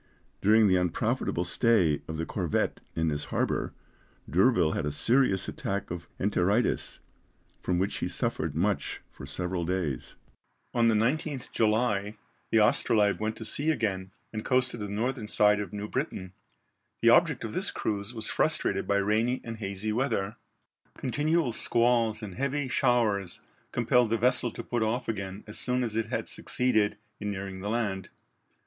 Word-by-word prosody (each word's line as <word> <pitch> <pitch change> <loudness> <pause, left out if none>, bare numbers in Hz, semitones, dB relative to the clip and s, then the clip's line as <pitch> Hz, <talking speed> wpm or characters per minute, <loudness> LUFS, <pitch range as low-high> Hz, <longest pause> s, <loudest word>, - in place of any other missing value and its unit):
During 110 +1 +5
the 95 -1 +4
unprofitable 90 -2 0
stay 90 -11 +2
of 80 - -5
the 80 - -2
corvette 90 -5 -1 0.2
in 80 0 +1
this 75 -1 -2
harbour, - - -1 0.6
D'Urville 95 -2 +3
had 75 - -2
a - - -1
serious 115 - +2
attack 100 -2 -4
of 85 -1 -6
enteritis, 100 +3 0 0.6
from 90 - 0
which 95 +2 0
he - - -2
suffered - - -2
much - - -1
for - - -10
several 90 0 -3
days. 85 -7 -3 0.6
On 120 -1 +3
the 115 - +4
19th 135 +4 -1
July 110 -2 +1 0.3
the 115 - +4
Astrolabe 105 -4 +3
went 110 +1 -2
to 110 - -6
sea 145 +8 +2
again 100 -9 -1 0.2
and 110 0 -4
coasted 125 -2 +1
the 105 - -4
northern 115 +2 -2
side 105 -1 +4
of 105 - -4
New 105 0 -5
Britain, 100 - -4 0.7
the - - +7
object - - +4
of - - -5
this - - -1
cruise 100 +1 -3
was 110 -3 -4
frustrated - - +1
by 100 - +2
rainy 110 +5 +1
and 115 -1 -6
hazy 100 0 -3
weather. 110 -5 -1 0.6
Continual 150 +1 0
squalls 115 -1 +2
and 100 -3 -6
heavy 140 +4 -1
showers 110 -8 +1 0.3
compelled 120 0 +2
the 115 - +1
vessel 125 +1 +3
to 115 - -7
put 120 0 -2
off 115 +4 -1
again 100 -2 -4
as 105 - -3
soon 125 0 +1
as 110 -3 -3
it 115 0 0
had - - -3
succeeded 110 -5 +1 0.2
in 105 - -3
nearing 95 -1 -5
the 100 +2 -4
land. 105 -5 -2
110 Hz, 160 wpm, -28 LUFS, 95-120 Hz, 0.7 s, the